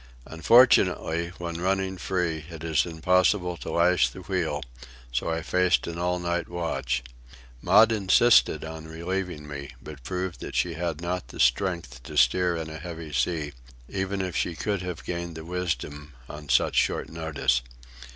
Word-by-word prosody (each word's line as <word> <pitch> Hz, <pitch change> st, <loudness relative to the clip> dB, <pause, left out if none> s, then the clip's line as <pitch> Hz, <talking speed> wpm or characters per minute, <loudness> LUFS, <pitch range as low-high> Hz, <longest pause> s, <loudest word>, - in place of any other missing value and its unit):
Unfortunately, 85 Hz, -2 st, +4 dB
when 85 Hz, -1 st, -5 dB
running 95 Hz, 0 st, 0 dB
free, 90 Hz, -4 st, -2 dB
it 80 Hz, -1 st, -9 dB
is 80 Hz, +1 st, +1 dB
impossible 90 Hz, +2 st, +2 dB
to -, -, -7 dB
lash 90 Hz, +1 st, +3 dB
the 95 Hz, -, -10 dB
wheel, 85 Hz, -5 st, -2 dB, 0.5 s
so -, -, -1 dB
I 80 Hz, -1 st, -2 dB
faced 90 Hz, 0 st, +2 dB
an 85 Hz, 0 st, -5 dB
all 90 Hz, 0 st, 0 dB
night 85 Hz, -1 st, -2 dB
watch. 85 Hz, -8 st, -2 dB, 0.6 s
Maud 110 Hz, +5 st, +6 dB
insisted 110 Hz, +1 st, +4 dB
on 80 Hz, 0 st, -8 dB
relieving 85 Hz, -1 st, -4 dB
me, 70 Hz, -1 st, -7 dB
but 75 Hz, -3 st, -10 dB
proved 90 Hz, +2 st, -4 dB
that -, -, -7 dB
she -, -, +1 dB
had 85 Hz, -2 st, -3 dB
not 90 Hz, +1 st, -3 dB
the -, -, -11 dB
strength 80 Hz, +1 st, +1 dB
to -, -, -8 dB
steer 90 Hz, +8 st, +4 dB
in 80 Hz, -1 st, -4 dB
a 80 Hz, 0 st, -7 dB
heavy 80 Hz, -2 st, -7 dB
sea, 75 Hz, -2 st, -1 dB, 0.3 s
even 95 Hz, +2 st, -2 dB
if 90 Hz, -2 st, -4 dB
she 85 Hz, -, -1 dB
could 100 Hz, 0 st, -2 dB
have 90 Hz, -2 st, -5 dB
gained 85 Hz, -1 st, -4 dB
the 80 Hz, 0 st, -8 dB
wisdom 80 Hz, -4 st, -4 dB
on 75 Hz, -1 st, -9 dB
such 65 Hz, -, +3 dB
short -, -, +1 dB
notice. 80 Hz, -6 st, 0 dB
85 Hz, 160 wpm, -26 LUFS, 80-90 Hz, 0.6 s, Maud